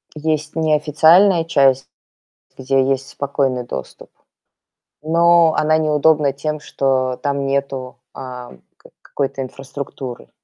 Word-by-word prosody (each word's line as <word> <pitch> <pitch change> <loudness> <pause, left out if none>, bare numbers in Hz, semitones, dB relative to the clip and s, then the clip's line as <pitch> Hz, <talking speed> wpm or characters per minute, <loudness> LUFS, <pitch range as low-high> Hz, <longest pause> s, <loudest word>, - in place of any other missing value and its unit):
Есть 155 0 -2
неофициальная 160 +4 +4
часть, 135 -5 +2 0.7
где 135 0 +1
есть 135 0 -1
спокойный 135 -3 -2
доступ. 65 - -8 0.9
Но 170 +1 +4
она 155 +1 +2
неудобна 150 -2 +2
тем, 150 +2 -4
что 130 -3 -1
там 140 -1 -1
нету, 135 -2 -3 0.2
ам, 125 -2 -9 0.2
ка - - -19
какой-то 135 -1 -4
инфраструктуры. 135 -1 -8
140 Hz, 105 wpm, -19 LUFS, 135-155 Hz, 0.9 s, неофициальная